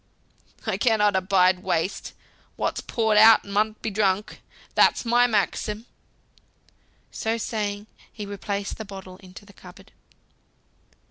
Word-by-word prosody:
"I - - -1
cannot 210 -4 +2
abide 185 -1 +3
waste. 185 +2 -2 0.4
What's - - -2
poured 220 -2 +1
out 220 +1 +7
mun 210 +2 0
be 220 - -2
drunk. 200 0 -1 0.3
That's - - +3
my 240 +1 +4
maxim." 210 0 -1 1.3
So 225 +1 -2
saying, 210 -2 -3 0.3
he 210 - -7
replaced 200 0 -5
the - - -4
bottle 190 -2 -10
in 185 -2 -16
the 205 0 -18
cupboard. 190 +2 -16
205 Hz, 120 wpm, -24 LUFS, 195-220 Hz, 1.3 s, out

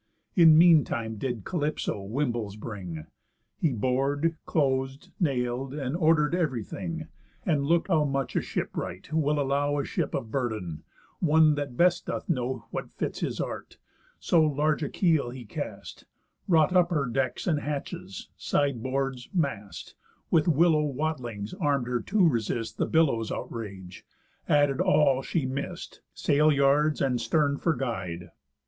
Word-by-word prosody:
In 165 -4 +8
mean 165 -3 +7
time 110 -2 -4
did 120 -2 -3
Calypso 150 - -2
wimbles 115 -1 -2
bring. 95 -8 -7 0.5
He 160 - +2
bor'd, 135 +7 0
clos'd, 135 -2 0
nail'd, 130 -3 -1
and 140 -1 -3
order'd 160 -2 +3
ev'ry 150 -10 0
thing, 165 +8 -5 0.4
And 145 -6 +1
look 170 +2 +2
how 160 -5 +3
much 135 -2 -2
a - - +2
ship - - -4
wright 90 - -5
will 150 -1 +1
allow 145 +1 +1
A 140 - -1
ship - - -2
of 110 - -4
burden 110 - -3 0.4
(one 155 -2 +5
that 145 -4 -4
best 175 0 +3
doth - - -4
know 130 - -2
What - - -4
fits - - -4
his - - -3
art) - - -5 0.4
so 170 - +3
large 150 0 +1
a 145 - -2
keel 160 -9 +2
he 125 -1 -8
cast, - - -7 0.4
Wrought 165 0 +4
up 175 -1 +5
her 150 -6 0
decks, 130 +2 -2
and 155 -4 +1
hatches, 145 -1 -5
side 140 -5 0
boards, 130 0 -2
mast, 135 - -3 0.4
With 160 0 +3
willow 160 0 +4
watlings 130 -8 -3
arm'd 145 - 0
her 125 -1 -1
to 190 - +3
resist 115 -3 -2
The - - +1
billows' 135 -9 +2
outrage, 95 -5 -7 0.5
added 145 +1 +3
all 150 -8 +3
she 150 +1 -1
miss'd, 135 +2 -5 0.2
Sail 150 +2 +3
yards, 145 +2 +3
and 125 -3 +1
stern 140 +4 +1
for 165 -2 +1
guide. 90 -9 -4
140 Hz, 150 wpm, -27 LUFS, 120-155 Hz, 0.5 s, In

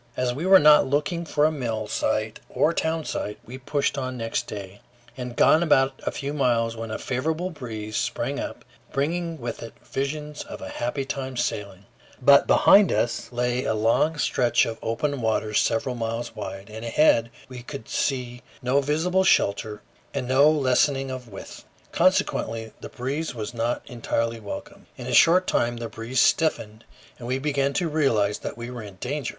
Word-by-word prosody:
As 125 -1 0
we 155 +8 -3
were 190 0 +9
not 150 -4 +6
looking 150 +5 -1
for 150 -2 +2
a 155 - +3
mill 115 -7 -3
site 110 +1 -1
or 165 - +2
town 160 -1 -1
site, 105 - -4
we 130 +3 -9
pushed 140 +2 -1
on 130 -1 -4
next 115 -1 -2
day. 100 -1 -8 0.3
We 125 - -5
had 120 -1 -7
gone 160 +5 +4
but 135 -1 +4
a - - 0
few 140 +1 -4
miles 120 -5 +1
when 115 0 -6
a 110 - -3
favorable 160 +8 -2
breeze 110 -8 -6
sprang - - -2
up, - - -6 0.3
bringing 165 +3 -2
with 120 -1 -5
it 115 -1 -9
visions 150 +2 -4
of - - -9
a - - -7
happy 125 +3 -3
time 135 -2 -4
sailing; 100 -5 -3 0.3
but 140 +2 +6
behind 200 -1 +6
us 120 - -1
lay 125 +1 -1
a 110 - 0
long 115 +9 +2
stretch 120 -4 +2
of 115 -1 -5
open 140 +4 -2
waters 110 -1 +1
several 120 +3 0
miles 115 0 -4
wide, 100 0 -7
and 110 +1 -8
ahead 115 -1 +3 0.2
we 130 -1 -9
could 125 -1 -8
see 125 -3 -2 0.2
no 130 +3 +2
visible 165 +7 +1
shelter 105 - +1 0.3
and 125 - -2
no 135 +4 +5
lessening 135 -2 +2
of 130 -2 -7
width; 100 -3 -10 0.3
consequently 115 -1 +1
the - - -7
breeze 140 +4 -4
was 110 +1 -5
not 120 +1 -1
entirely 115 -1 -2
welcome. 105 -2 -8
In - - -7
a - - -3
short 180 +3 +6
time 120 -6 0
the 115 -1 -5
breeze 120 +3 -3
stiffened, 115 -10 +1 0.3
and 120 - -7
we 130 +1 0
began 140 0 0
to 175 - 0
realize 115 -10 +1
that - - -6
we 120 +1 -6
were 120 -2 -6
in 100 -3 -10
danger. 135 +7 -3
125 Hz, 180 wpm, -25 LUFS, 115-145 Hz, 0.3 s, were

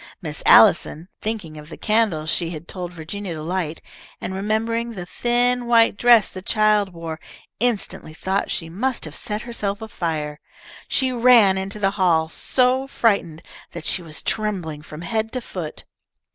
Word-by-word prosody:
Miss - - -4
Allison, 165 +4 +6
thinking 205 -9 -4
of 150 +1 -12
the - - -9
candle 210 -8 +1
she 165 +1 0
had 165 0 -8
told 180 -2 -6
Virginia 175 +2 -6
to 155 - -6
light, 170 -2 -3 0.4
and 190 - -5
remembering 225 +4 -1
the 180 -4 -6
thin, 245 +4 0
white 230 -2 +5
dress 235 0 +5
the 185 - -9
child 210 0 +2
wore, 165 -2 -6 0.4
instantly 230 -8 -1
thought 190 +4 -1
she 165 - -3
must 235 +9 -2
have 155 -1 -8
set 210 +1 -3
herself 210 -4 -3
afire. 160 -9 -4 0.5
She 260 -1 +1
ran 235 -5 +6
into 190 +2 -3
the 195 -2 +1
hall, 160 -3 +3
so 255 +7 +1
frightened 200 - 0 0.3
that - - -7
she 180 - -1
was 160 -2 -5
trembling 185 -9 -2
from 155 +1 -10
head 220 +4 -2
to 255 - -1
foot. 180 -9 -7
195 Hz, 160 wpm, -22 LUFS, 165-230 Hz, 0.5 s, Allison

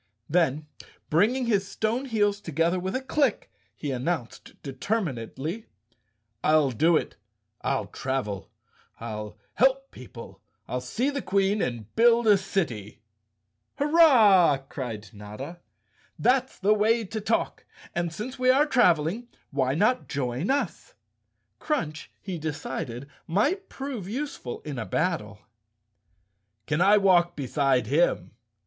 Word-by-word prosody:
Then, 155 -3 +1 0.5
bring¬ 205 +11 +4
ing 260 -1 -1
his 200 -4 +1
stone 220 +6 -1
heels 205 -4 +1
together 165 +1 0
with 190 +4 -3
a 260 - -2
click, 270 -3 0 0.2
he 145 - -4
announced 130 0 -4
determinedly, 150 - -3 0.8
"I'll 155 -3 +4
do 160 +7 +3
it! - - -4 0.4
I'll 135 -1 -1
travel, 130 -8 -4 0.5
I'll 105 -2 -6 0.2
help 270 +1 +2
people, 120 -2 -11 0.3
I'll 125 - -3
see 235 - -1
the 280 -1 -3
Queen 195 +1 +1
and 115 -4 -4
build 235 +1 +5
a 210 -2 +7
city!" 120 - -3 0.7
"Hurrah!" 240 - +6
cried 115 -6 -6
Notta. 105 +11 -8 0.6
"That's 260 +1 +1
the 205 +2 +3
way 225 +2 +2
to 220 +3 -5
talk. 225 +2 -1 0.3
And 170 -1 -1
since 245 +9 -6
we 255 0 +3
are 275 +3 +5
traveling, 200 - +2 0.2
why 135 -1 0
not 215 +9 +1
join 135 +3 -2
us?" 285 - -2 0.6
Crunch, 155 - -3
he 185 -4 -5
decided, 140 -4 -5 0.2
might 290 - 0
prove 260 -9 -6
useful 250 - -5
in 145 -5 -6
a 110 - -3
battle. 160 - -2 1.2
"Can 155 +3 0
I 200 +3 +6
walk 175 -3 +4
beside 135 -3 +1
him?" 130 - +1
175 Hz, 125 wpm, -26 LUFS, 135-225 Hz, 1.2 s, a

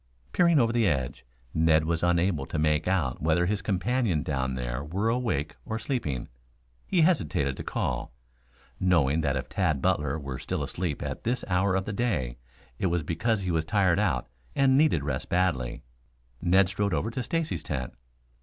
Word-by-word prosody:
Peering 170 -2 +4
over 115 -2 +2
the 115 -3 +3
edge, 65 -7 -2 0.3
Ned 80 -1 +3
was 85 0 0
unable 85 -4 +1
to - - -3
make 75 +1 +1
out 85 -10 0
whether 80 +3 +2
his 100 +3 0
companion 100 - 0
down 65 -3 -1
there - - -3
were 95 +9 -1
awake 110 - -1
or 110 -1 -3
sleeping. 95 - -2 0.6
He 180 -3 +3
hesitated 75 - +2
to - - -5
call, - - -2 0.7
knowing 80 -5 +3
that 70 -3 0
if 65 0 -3
Tad 85 -3 0
Butler 75 -4 +1
were 70 -3 -5
still 65 - -3
asleep 85 -5 -3
at - - -5
that 120 +2 -1
hour 95 +1 +2
of 95 0 0
the 110 - -3
day 75 - -1 0.4
it - - +1
was 85 -2 0
because 100 +8 0
he 90 -2 -1
was 80 -1 +1
tired 95 +1 +2
out 85 -12 0 0.3
and 135 -1 +4
needed 140 - +3
rest 70 -3 -3
badly. 85 -10 0 0.6
Ned 95 +2 +4
strode 100 -1 0
over 115 - -1
to 125 - -3
Stacy's 165 +4 -2
tent. 65 -4 -4
85 Hz, 175 wpm, -27 LUFS, 70-105 Hz, 0.7 s, Peering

